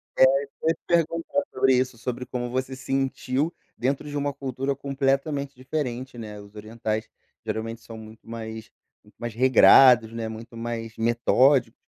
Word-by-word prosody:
É, - - -1 0.2
isso 140 - -13
que - - -8
eu - - +4
ia 165 - +2
te - - -42
perguntar 165 -3 +1
sobre 130 0 +3
isso, 130 -1 0
sobre 125 +2 -4
como 120 -1 -4
você 130 +1 -3
sentiu 135 +2 -1 0.2
dentro 135 +4 -1
de 145 - -6
uma 145 0 0
cultura 135 0 -3
completamente 140 +1 -1
diferente, 130 -2 -4
né, 105 -2 -7
os 100 0 -14
orientais 110 0 -4 0.3
geralmente 115 +1 -4
são 115 - -10
muito 110 0 -13
mais 110 -1 -7 0.3
muito - - -23
mais 120 -1 -5
regrados, 125 -1 +7
né, 115 -1 -4
muito 115 +1 -9
mais 115 -1 -5
metódicos, 120 +2 +3
125 Hz, 165 wpm, -25 LUFS, 115-135 Hz, 0.3 s, regrados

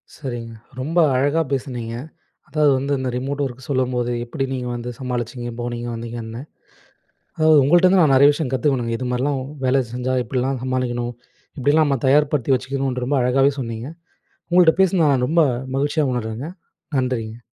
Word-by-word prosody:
சரிங்க, 120 -5 -6 0.3
ரொம்ப 155 +7 -3 0.2
அழகா 145 +5 +2
பேசுனீங்க. 125 -4 -3 0.6
அதாவது 150 0 +3
வந்து 140 +2 -2
இந்த 130 0 -2
ரிமோட் 135 +3 -3
ஒர்க் 130 -1 -7
சொல்லும்போது, 125 -3 0
எப்படி 130 +3 -3
நீங்க 125 -1 -3
வந்து 120 0 -5
சமாளிச்சீங்க, 120 -1 -4
போனீங்க, 120 0 -4
வந்தீங்கன்னு. 115 0 -6 0.9
அதாவது 155 -1 +5
உங்கள்ட்ட 175 +6 +5
இருந்து 185 0 +5
நான் 145 -4 +4
நெறைய 140 +2 +7
விஷயம் 145 -3 -3
கத்துக்கணும். 130 -2 0
இது 125 - -4
மாரிலாம் 135 +2 0 0.2
வேலை 130 +1 +3
செஞ்சா 125 +1 -2
இப்படில்லாம் 130 0 -2
சமாளிக்கணும். 120 -2 -2 0.5
இப்படியெல்லாம் 145 +4 +3
நம்ம 135 -3 0
தயார்படுத்தி 140 -1 +3
வைச்சுக்கணுன்று 130 -1 -2
ரொம்ப 145 +2 +1
அழகாவே 135 +3 +3
சொன்னீங்க. 115 0 -5 0.6
உங்கள்ட்ட 175 -2 +6
பேசினதை 180 -4 +4
நான் 125 -2 +1
ரொம்ப 165 +2 +3 0.4
மகிழ்ச்சியா 145 +2 +1
உணர்றேங்க. 120 +3 -4 0.5
நன்றிங்க. 120 -4 -2
130 Hz, 145 wpm, -21 LUFS, 120-145 Hz, 0.9 s, நெறைய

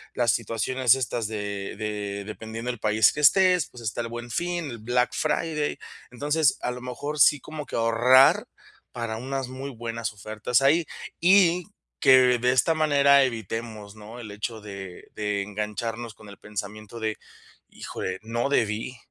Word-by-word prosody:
las 120 -2 +3
situaciones 115 +4 +1
estas 120 -4 -2
de 100 -2 -5
de 105 -2 -4
dependiendo 110 +3 -5
el 120 - -9
país 105 0 +3
que 150 - -4
estés, 180 +2 +5
pues 125 - -12
está 110 +2 -2
el 115 - -4
Buen 120 +1 -7
Fin, 175 +2 -2
el 120 - -8
Black 125 +3 +1
Friday. 150 -3 -1 0.3
Entonces, 145 +3 +1
a 125 - -1
lo 125 0 -7
mejor 145 +4 -5
sí 145 +2 +6
como 155 -1 -7
que - - -7
ahorrar 120 +3 +5 0.4
para 115 -2 -4
unas 135 +2 -4
muy 130 +2 -6
buenas 115 -1 -4
ofertas 110 +5 -1
ahí. 155 +4 +3 0.4
Y 180 -1 +5 0.3
que, 125 -2 +6
de 125 +1 +2
esta 130 +6 +3
manera, 140 -3 +4
evitemos, 110 -3 -5
¿no?, 110 +3 -11
el 110 -3 -8
hecho 110 +2 -5
de 95 -3 -9
de 105 -1 -1
engancharnos 105 +3 -4
con 110 0 -16
el 100 - -12
pensamiento 105 +2 -7
de: 110 -1 -2 0.5
"Híjole, 95 0 -6
no 120 +4 -2
debí 115 -1 -1
120 Hz, 160 wpm, -25 LUFS, 105-135 Hz, 0.5 s, sí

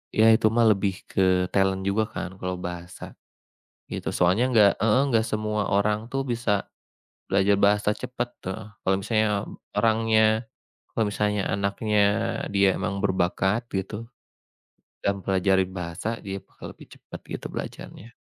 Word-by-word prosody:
Ya 110 +1 +6
itu 110 0 +4
mah 120 - +4
lebih 100 -2 -1
ke 95 -1 +2
talent 95 0 +1
juga 100 +3 +1
kan 105 - -5
kalau 90 0 -3
bahasa. 90 0 -7 0.8
Itu - - -4
soalnya 90 +6 +3
enggak 110 -5 +6
heeh, 115 +3 +4
enggak 115 -3 +2
semua 105 -1 -1
orang 105 +1 +2
tuh 135 - 0
bisa 110 -4 -1 0.6
belajar 100 +1 +3
bahasa 105 +1 +3
cepet 125 +2 -4
tuh. 95 0 -3 0.3
Kalau 95 - +2
misalnya 110 +2 +1 0.5
orangnya 110 +1 +3 0.4
kalau 115 - 0
misalnya 105 0 0
anaknya 100 +2 0 0.6
dia 100 0 +5
memang 100 -1 -3
berbakat 95 +4 +1
gitu, 105 +4 -4 0.9
dan 100 0 0
mempelajari 95 0 +2
bahasa, 85 +3 -5 0.2
dia 95 0 -4
bakal - - -14
lebih - - -14
cepat - - -10
gitu - - -6
belajarnya. 115 - -7
100 Hz, 140 wpm, -25 LUFS, 95-110 Hz, 0.9 s, Ya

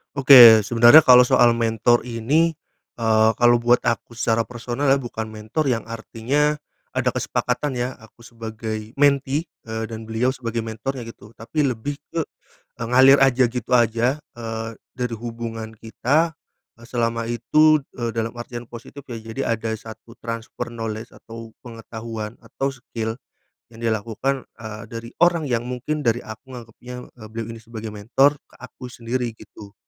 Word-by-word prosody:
Oke, 125 -5 +10
sebenarnya 120 +7 +7
kalau 125 -1 +9
soal 120 -1 +4
mentor 115 +1 +2
ini, 125 +8 +1 0.5
eee, 110 -1 +4
kalau 120 0 +4
buat 120 +1 +4
aku 115 0 -1
secara 115 +1 +2
personal 120 +4 -2
ya, 135 - +5
bukan 110 -4 -6
mentor 110 +7 -2
yang 115 -2 -1
artinya, 130 +6 -1 0.3
ada - - -1
kesepakatan 125 +1 -2
ya, 125 +1 -2
aku 115 +1 -18
sebagai 110 -1 -6
mentee, 140 +2 +2 0.2
eee, 110 0 -4
dan 110 0 -7
beliau 125 +4 0
sebagai 115 -3 -4
mentornya 115 +3 -5
gitu, 115 -2 -12
tapi 150 +7 -2
lebih 135 +1 -2 0.2
ke, 165 -2 -2 0.5
e - - -13
ngalir 130 +2 +6
aja, 130 -1 +5
gitu 120 0 -5
aja, 120 +3 +2 0.2
eee, 115 -1 -5 0.2
dari 125 -1 -2
hubungan 115 -1 -6
kita, 145 +9 0 0.5
eee, - - -12
selama 115 -1 -1
itu, 155 +7 +4 0.2
eee, 120 -1 -3
dalam 115 0 -3
artian 120 0 -7
positif 120 +4 -11
ya. 120 -4 -7
Jadi 115 +4 -5
ada 115 0 -1
satu 110 +2 -13
transfer 115 +1 -6
knowledge, 115 0 -5
atau 115 0 -11
pengetahuan, 115 -2 -7
atau 135 0 -3
skill, 115 -3 -5 0.6
yang 115 - -13
dilakukan, 115 +4 -2 0.2
eee, 110 0 -7
dari 115 +1 -8
orang 170 -3 +2
yang 120 -1 0
mungkin, 135 +4 -4
dari 120 +1 +2
aku 110 +4 -11
nganggepnya, 125 +1 -10 0.2
eee, - - -9
beliau 115 0 -5
ini 115 - -7
sebagai 110 -1 -8
mentor 125 +8 +2
ke - - -30
aku 130 0 -11
sendiri 120 0 -3
gitu. 100 -2 -14
115 Hz, 155 wpm, -22 LUFS, 115-130 Hz, 0.6 s, Oke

